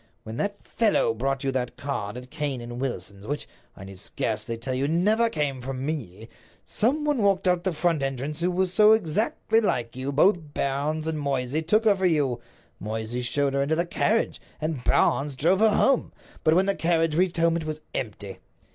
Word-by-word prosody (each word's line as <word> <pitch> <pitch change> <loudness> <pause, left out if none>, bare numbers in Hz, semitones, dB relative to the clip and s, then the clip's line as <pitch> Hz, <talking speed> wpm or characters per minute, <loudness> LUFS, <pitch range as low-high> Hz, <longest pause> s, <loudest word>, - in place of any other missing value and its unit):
When 110 +1 -7
that 205 +5 -3
fellow 215 - +2
brought 135 +4 -2
you 135 - 0
that 125 -2 -3
card 125 -7 -4
at 125 +1 -10
Cane 150 -4 -2
and 120 +1 -7
Wilson's—which, 105 +1 -4 0.3
I - - -9
need 95 -1 -10
scarcely 110 +3 -3
tell 125 +3 -3
you, 135 +2 0
never 210 +9 +2
came 145 - -2
from 130 +1 -4
me—some 155 - -3
one 295 -4 +1
walked 195 -2 +2
out 180 -1 +3
of - - -20
the 185 - +2
front 165 -1 +1
entrance 135 +3 -3
who 175 - +2
was 180 0 0
so 210 +2 +7
exactly 220 +3 +1
like 120 - -1
you 130 +1 -5
that 140 - -1
both 160 -1 +2
Barnes 150 +3 -1
and 160 -1 -1
Moysey 140 +1 -1
took 215 +8 +2
her 210 -2 +5
for 190 -1 +2
you. 140 -8 +1 0.4
Moysey 110 +3 -4
showed 140 +3 0
her 140 - +1
into 145 +3 +1
the 170 +2 0
carriage, 215 +6 0 0.2
and 155 -5 -3
Barnes 140 +2 +2
drove 170 +8 +2
her 220 0 +5
home. 270 -2 +2 0.3
But 155 - +4
when 185 +2 +4
the 200 - +3
carriage 165 -3 +1
reached 175 +1 +1
home 165 0 +3
it 165 -2 -3
was 155 0 -4
empty. 100 -4 -5
150 Hz, 200 wpm, -26 LUFS, 125-180 Hz, 0.4 s, so